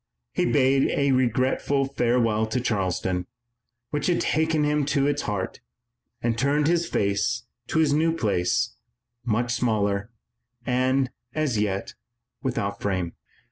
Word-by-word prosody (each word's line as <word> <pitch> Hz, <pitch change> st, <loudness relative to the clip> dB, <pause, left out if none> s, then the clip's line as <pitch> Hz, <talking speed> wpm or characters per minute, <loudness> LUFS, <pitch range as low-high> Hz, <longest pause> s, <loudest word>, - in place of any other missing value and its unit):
He -, -, +1 dB
bade 135 Hz, +1 st, +3 dB
a 140 Hz, -1 st, +3 dB
regretful 130 Hz, +2 st, +1 dB
farewell 120 Hz, -4 st, +1 dB
to 125 Hz, +4 st, -1 dB
Charleston, 95 Hz, -5 st, -1 dB, 0.6 s
which 150 Hz, -1 st, -1 dB
had 175 Hz, -1 st, +2 dB
taken 160 Hz, 0 st, +1 dB
him 150 Hz, 0 st, +2 dB
to 140 Hz, -2 st, +2 dB
its 145 Hz, 0 st, +1 dB
heart, 100 Hz, -3 st, -3 dB, 0.6 s
and 115 Hz, -1 st, +1 dB
turned 140 Hz, +4 st, +2 dB
his 170 Hz, +2 st, +2 dB
face 100 Hz, +4 st, 0 dB, 0.2 s
to -, -, -1 dB
this 155 Hz, -2 st, +4 dB
new 160 Hz, +2 st, +3 dB
place, 115 Hz, -, 0 dB, 0.5 s
much 120 Hz, +1 st, 0 dB
smaller, 105 Hz, -4 st, 0 dB, 0.6 s
and, 130 Hz, +1 st, +1 dB, 0.2 s
as 150 Hz, -8 st, 0 dB
yet, 105 Hz, +2 st, -1 dB, 0.5 s
without 100 Hz, -6 st, -2 dB
fame. 95 Hz, -4 st, -1 dB
125 Hz, 130 wpm, -25 LUFS, 105-140 Hz, 0.6 s, this